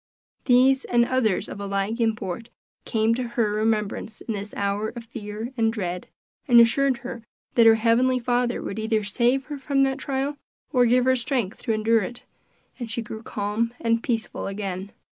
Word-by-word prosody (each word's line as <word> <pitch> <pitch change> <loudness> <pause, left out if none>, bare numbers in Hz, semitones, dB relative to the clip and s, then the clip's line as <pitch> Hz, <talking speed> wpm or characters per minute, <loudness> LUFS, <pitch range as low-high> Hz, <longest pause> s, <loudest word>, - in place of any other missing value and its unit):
These, 260 +1 +5
and 240 -1 +3
others 240 -6 +1
of - - -8
a 200 - -4
like 200 +4 -1
import, 220 -1 -2 0.4
came 220 -1 +2
to 245 - -1 0.2
her 220 -3 +2
remembrance 215 0 -1
in 225 - -4
this 205 0 -5
hour 200 +2 -1
of 235 - -6
fear 220 +1 -7
and 225 -2 +2
dread, 180 -5 -4 0.4
and 240 -3 +7
assured 255 +3 +4
her 235 -2 -6 0.3
that 230 -2 +6
her 225 - +8
heavenly 240 +3 +3
Father 245 0 0
would 205 - -4
either 220 -1 0
save 245 +6 +1
her 295 -2 -6
from 275 0 +1
that 270 0 0
trial, 275 +1 -2 0.4
or 250 -2 +5
give 250 +1 +3
her 260 0 +4
strength 245 -4 -2
to - - -1
endure 220 +1 +3
it; 240 +5 -6 0.6
and 240 -2 -5
she 230 +1 -3
grew 220 0 -7
calm 225 +2 -2
and 230 0 +1
peaceful 230 -3 -2
again. 195 -1 -4
230 Hz, 180 wpm, -24 LUFS, 215-250 Hz, 0.6 s, her